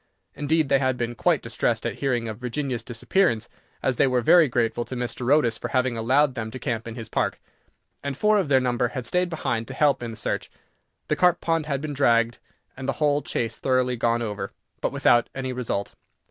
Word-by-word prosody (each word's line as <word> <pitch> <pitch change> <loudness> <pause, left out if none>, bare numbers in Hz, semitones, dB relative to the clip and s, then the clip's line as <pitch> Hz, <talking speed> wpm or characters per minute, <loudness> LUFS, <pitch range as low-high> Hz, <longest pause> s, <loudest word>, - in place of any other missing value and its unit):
Indeed, 155 0 +1
they 135 - +4
had 130 -2 +1
been 120 -1 -2
quite 120 - +1
distressed - - -1
at - - -3
hearing 125 -4 0
of 110 0 -6
Virginia's 125 0 -2
disappearance, 120 - 0 0.4
as 130 -3 +1
they - - +4
were 125 -1 +2
very 170 +4 +6
grateful 120 -1 0
to 130 - -6
Mr. 125 +1 -2
Otis 120 -7 +3
for - - -3
having 130 -2 0
allowed 130 +5 +2
them 110 -2 -4
to 130 - -7
camp 115 -3 -3
in 115 - -6
his 115 -2 -6
park, - - -1 0.6
and 140 -1 -3
four 210 +3 +4
of 185 - -1
their 135 -2 +5
number 125 -1 +1
had 125 0 -5
stayed 180 +7 +1
behind 120 -9 -2
to 130 - -7
help 145 -3 +3
in 120 - -4
the 110 - -7
search. - - -2 0.6
The - - +1
carp 180 -1 +3
pond 165 -2 0
had 140 -2 -1
been 150 -1 -4
dragged, 120 -4 +2 0.4
and 130 +1 -5
the - - +1
whole 145 +2 +1
Chase 115 -5 -2
thoroughly 130 -1 +1
gone 115 0 +1
over, 105 -2 -4 0.3
but - - 0
without 120 0 +3
any 130 -1 -3
result. 120 -5 -3
125 Hz, 215 wpm, -25 LUFS, 120-145 Hz, 0.6 s, very